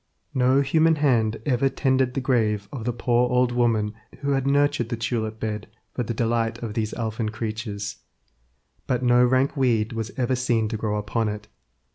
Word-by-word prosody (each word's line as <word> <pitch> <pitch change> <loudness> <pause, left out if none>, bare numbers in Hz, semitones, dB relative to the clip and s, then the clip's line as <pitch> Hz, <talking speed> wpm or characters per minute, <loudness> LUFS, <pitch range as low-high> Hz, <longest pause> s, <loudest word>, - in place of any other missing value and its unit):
No 130 +1 +3
human 160 +3 +3
hand 120 -7 +2
ever 135 -1 +2
tended 130 -2 +1
the 135 - 0
grave 110 -6 +1
of 120 -5 -6
the 120 - +1
poor 120 +1 +1
old 125 0 +2
woman 115 -3 +1 0.3
who 140 0 0
had 135 -1 +1
nurtured 140 -4 +2
the 120 - -2
tulip 110 -1 -2
bed 105 -1 -3 0.3
for - - -2
the 120 - -3
delight 115 0 0
of 110 -3 -4
these 110 -1 -2
elfin 110 -1 -2
creatures; 110 -1 -4 0.9
but 125 -1 0
no 125 0 +5
rank 130 +2 +2
weed 120 -5 +1
was 115 -1 -3
ever 130 0 +1
seen 120 -3 +1
to 115 - -3
grow 105 -1 -1
upon 105 +2 -1
it. 105 0 -7
120 Hz, 180 wpm, -24 LUFS, 110-130 Hz, 0.9 s, no